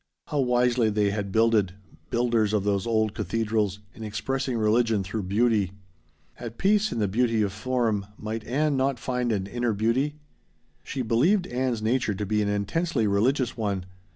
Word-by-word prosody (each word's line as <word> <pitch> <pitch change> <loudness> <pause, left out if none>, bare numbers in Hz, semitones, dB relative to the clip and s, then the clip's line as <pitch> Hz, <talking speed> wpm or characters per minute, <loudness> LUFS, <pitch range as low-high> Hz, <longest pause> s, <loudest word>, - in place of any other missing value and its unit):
How 150 - -1
wisely 125 -2 +2
they 105 -1 +1
had 100 -1 -3
builded 110 -4 +3 0.3
builders 115 -3 +1
of 105 -2 +1
those 100 0 0
old 110 -2 +1
cathedrals 105 0 -1
in 110 - -9
expressing 130 +4 -2
religion 110 -1 +2
through 95 +4 -3
beauty. 105 -3 +2 0.7
At 115 -1 -7
peace 210 +2 +2
in - - -3
the 105 -2 +1
beauty 115 +1 +1
of 100 -2 -2
form, 110 -2 -1
might 110 +1 -4
Ann 145 +4 +1
not 135 0 +1
find 125 0 -1
an 100 -3 -1
inner 120 +2 -1
beauty? 115 +8 0 0.7
She 130 +8 -3
believed 160 - +3
Ann's 125 -4 -2
nature 115 -2 +1
to 105 +2 -3
be 105 +1 +1
an 100 - 0
intensely 115 - 0
religious 120 +5 +1
one. 100 -5 -2
115 Hz, 165 wpm, -26 LUFS, 105-125 Hz, 0.7 s, builded